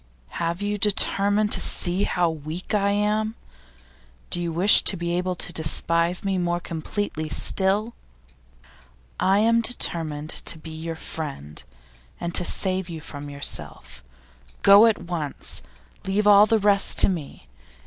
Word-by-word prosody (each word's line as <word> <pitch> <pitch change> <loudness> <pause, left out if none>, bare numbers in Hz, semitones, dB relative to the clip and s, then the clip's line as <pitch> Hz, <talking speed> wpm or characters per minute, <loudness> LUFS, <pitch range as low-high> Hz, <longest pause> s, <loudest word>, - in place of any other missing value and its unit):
'Have 170 +3 -3
you 205 0 -2
determined 205 +1 +2
to - - +1
see 180 +2 +1
how 175 -1 0
weak 160 +4 -6
I 200 -1 +2
am? 210 +2 0 1.0
Do 175 - +1
you 170 -1 -3
wish 180 +6 +6
to 190 - +3
be 170 0 -2
able 180 +1 -2
to 180 - -6
despise 170 +2 +1
me 190 -1 0
more 175 0 -1
completely 160 -1 -4
still?' 205 +4 0 1.3
'I 195 +1 +3
am 230 +2 +3
determined 160 -10 -3
to - - -1
be 160 +1 -11
your 160 +1 -6
friend, 140 - -6 0.6
and 170 0 -4
to 180 - +3
save 185 0 -1
you 165 -2 -6
from 145 -2 -9
yourself. 65 - -6 0.6
Go 200 +3 +8
at 220 - +2
once! 165 -5 -6 0.4
Leave 200 +2 0
all 205 0 +7
the 225 - +3
rest 200 -1 +2
to - - +5
me. 155 - -5
180 Hz, 145 wpm, -23 LUFS, 160-205 Hz, 1.3 s, Go